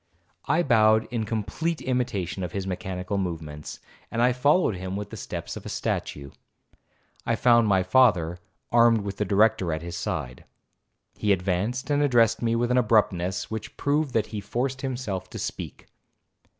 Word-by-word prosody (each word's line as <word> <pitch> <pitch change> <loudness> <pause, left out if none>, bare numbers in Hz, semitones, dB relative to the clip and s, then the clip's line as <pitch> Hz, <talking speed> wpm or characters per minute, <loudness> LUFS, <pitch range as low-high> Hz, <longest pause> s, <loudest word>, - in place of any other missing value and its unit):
I 160 +5 +3
bowed 110 -4 +4
in 115 -2 -1
complete 115 +10 -2
imitation 115 -8 -2
of 90 - -5
his 100 -1 -3
mechanical 95 +1 -3
movements, 80 -5 -5 0.3
and 120 +2 +2
followed 145 - +3
him 95 +1 -5
with 100 0 -5
the - - -6
steps - - -6
of - - -8
a - - -7
statue. 70 -1 -3 0.9
I - - 0
found 120 -2 +4
my 95 -2 +3
father, 90 -7 +3 0.3
armed 115 -2 +5
with 100 -1 -5
the 105 - 0
Director 100 -2 +3
at 80 +1 -3
his 85 0 -6
side. 65 -7 -4 0.7
He 105 - +1
advanced, 100 - -1
and 145 0 +2
addressed 115 -5 +3
me 115 -1 +1
with 120 +1 0
an 125 - +4
abruptness 95 -6 +1
which 110 -1 -6
proved 145 -1 0
that 110 - +2
he 105 - -3
forced 130 +6 -2
himself 125 -8 -4
to - - -8
speak. - - -6
110 Hz, 165 wpm, -26 LUFS, 95-125 Hz, 0.9 s, armed